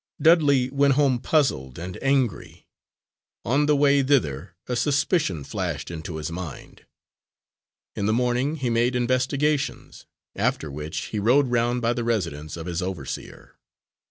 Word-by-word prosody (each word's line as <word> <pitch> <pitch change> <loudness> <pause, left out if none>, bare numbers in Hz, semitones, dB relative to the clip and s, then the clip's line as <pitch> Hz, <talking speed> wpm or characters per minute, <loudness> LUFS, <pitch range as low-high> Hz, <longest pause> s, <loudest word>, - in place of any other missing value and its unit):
Dudley 145 -6 +4
went 140 -1 +3
home 135 -4 +3
puzzled 115 - 0
and 90 +2 -7
angry. 120 -12 -1 0.8
On 140 +5 +2
the 150 - +4
way 140 0 +4
thither 90 - 0
a 125 - -2
suspicion 140 - +1
flashed - - -4
into 80 0 -6
his 80 +1 -4
mind. 85 -4 -8 1.1
In 100 - -1
the - - +2
morning 125 +5 +1
he 130 -6 -2
made 120 +2 +1
investigations, 135 +3 -1 0.3
after 75 - -1
which 75 +2 -5
he 105 - 0
rode 125 +5 +3
round 120 0 +1
by 115 +1 +2
the 120 - -3
residence 85 -10 -2
of 80 - -6
his 85 0 -3
overseer. 90 -7 -7
120 Hz, 140 wpm, -24 LUFS, 85-140 Hz, 1.1 s, Dudley